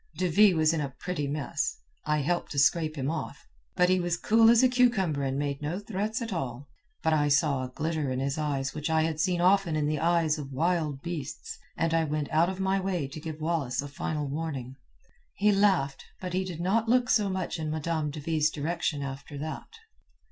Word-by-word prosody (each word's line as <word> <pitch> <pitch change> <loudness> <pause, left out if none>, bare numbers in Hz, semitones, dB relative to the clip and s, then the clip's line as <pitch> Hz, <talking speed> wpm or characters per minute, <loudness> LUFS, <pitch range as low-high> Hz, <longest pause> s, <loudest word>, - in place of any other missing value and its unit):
"De 185 - +1
Ville 190 +1 +5
was 155 0 +3
in 160 - 0
a 140 - -2
pretty 180 -6 -3
mess—I 145 +2 -3
helped 175 +5 -1
to - - -6
scrape 155 +2 +3
him 140 0 -1
off; 160 - -6 0.3
but 180 -1 +4
he 185 0 +3
was 175 -1 0
cool 225 +4 +5
as 235 +1 +6
a - - +7
cucumber 235 - +2
and 135 0 -1
made 140 -1 -2
no 155 +4 -2
threats 210 +3 -3
at 225 -3 -4
all. 135 -4 -4 0.4
But 160 - +3
I 145 -1 +3
saw 145 -2 +2
a 130 - -5
glitter 155 +1 -2
in 130 0 -2
his 135 +1 -1
eyes 140 -3 -2
which 150 +1 -3
I 160 0 +3
had 160 -1 -2
seen 175 +1 +1
often 185 -2 +3
in 150 -1 +1
the 150 0 0
eyes 165 -2 +2
of 140 -2 -7
wild 155 -1 0
beasts, 165 -5 -6 0.2
and 165 0 +1
I 165 -1 +2
went 150 -1 -2
out 165 +3 +3
of 190 0 -5
my 190 0 +1
way 185 -6 -1
to 145 - -8
give 160 -1 -6
Wallace 155 -6 -1
a 145 - -1
final 150 +1 -3
warning. 140 -4 -4 0.6
He 210 +1 +3
laughed, 195 -9 +2 0.2
but 180 -1 -5
he 185 +1 0
did 170 -3 -6
not 220 +5 +1
look 250 +1 +3
so 210 -4 +3
much 185 -2 -3
in 155 -1 -3
Madame 155 0 -1
de 150 +1 -6
Ville's 155 0 +1
direction 155 -1 -2
after 140 +1 -7
that. 155 +2 -6
160 Hz, 215 wpm, -28 LUFS, 145-180 Hz, 0.6 s, a